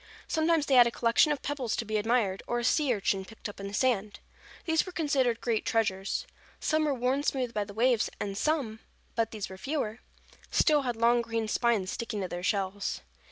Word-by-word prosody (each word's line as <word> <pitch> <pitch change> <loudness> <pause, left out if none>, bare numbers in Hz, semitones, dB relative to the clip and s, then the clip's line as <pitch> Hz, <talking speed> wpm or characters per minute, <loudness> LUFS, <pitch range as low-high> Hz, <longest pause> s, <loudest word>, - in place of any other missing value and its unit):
Sometimes 320 -1 +2
they 275 - 0
had 245 -2 +8
a - - +2
collection 235 +5 +3
of 290 -3 -2
pebbles 270 -5 -2
to 230 - -3
be 215 0 -1
admired, 210 -3 +1
or 240 - 0
a 240 - -2
sea 285 +2 +2
urchin 195 -3 0
picked 220 +4 -9
up 205 - -10
in 200 - -5
the 200 - -8
sand. 215 -5 0 0.5
These 320 -1 +2
were 370 - -8
considered 275 -8 +1
great 230 -3 0
treasures. 195 -4 0 0.3
Some 310 0 +1
were 295 - +1
worn 255 +3 +1
smooth 260 -4 -1
by 210 -1 -1
the 200 - -10
waves, 235 0 +2
and 200 -1 -3
some—but 230 -4 -2
these 215 -3 -5
were 190 0 -10
fewer—still 285 - -1
had 245 -3 -2
long 235 +1 +3
green 230 -1 -2
spines 215 -4 +1
sticking 225 -3 -4
to 185 - -2
their 175 0 -5
shells. 195 +1 -1
235 Hz, 200 wpm, -29 LUFS, 210-270 Hz, 0.5 s, had